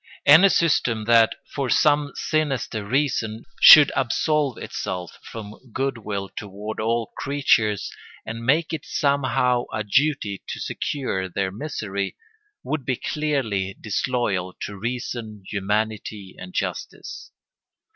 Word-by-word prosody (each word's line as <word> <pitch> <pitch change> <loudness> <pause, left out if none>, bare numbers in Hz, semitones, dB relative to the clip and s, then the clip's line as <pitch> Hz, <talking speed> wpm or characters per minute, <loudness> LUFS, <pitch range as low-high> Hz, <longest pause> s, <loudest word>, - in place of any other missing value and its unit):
Any 160 +7 +8
system 120 - +2
that, 115 -1 +5 0.2
for 140 -3 -2
some 145 +1 +3
sinister 135 -8 -1
reason, 115 -2 -1
should 150 -2 +10
absolve 145 +1 +1
itself 90 -2 -5
from 110 +3 -10
good 135 0 -2
will 100 -3 -4
toward 105 +2 -7
all 115 +1 -1
creatures, 115 -7 +1 0.3
and 115 +1 -6
make 155 +7 +2
it 160 - -3
somehow 130 -3 +1
a 110 - -2
duty 105 -3 +1
to - - -5
secure 95 -10 -3
their 95 +1 -2
misery, 100 -5 -4 0.5
would 155 -3 -3
be 125 0 -1
clearly 115 -12 -2
disloyal 110 -6 -1
to 105 - -5
reason, 115 -1 -5
humanity, 105 -1 -3
and 185 - -10
justice. - - -5
115 Hz, 115 wpm, -23 LUFS, 105-140 Hz, 0.5 s, should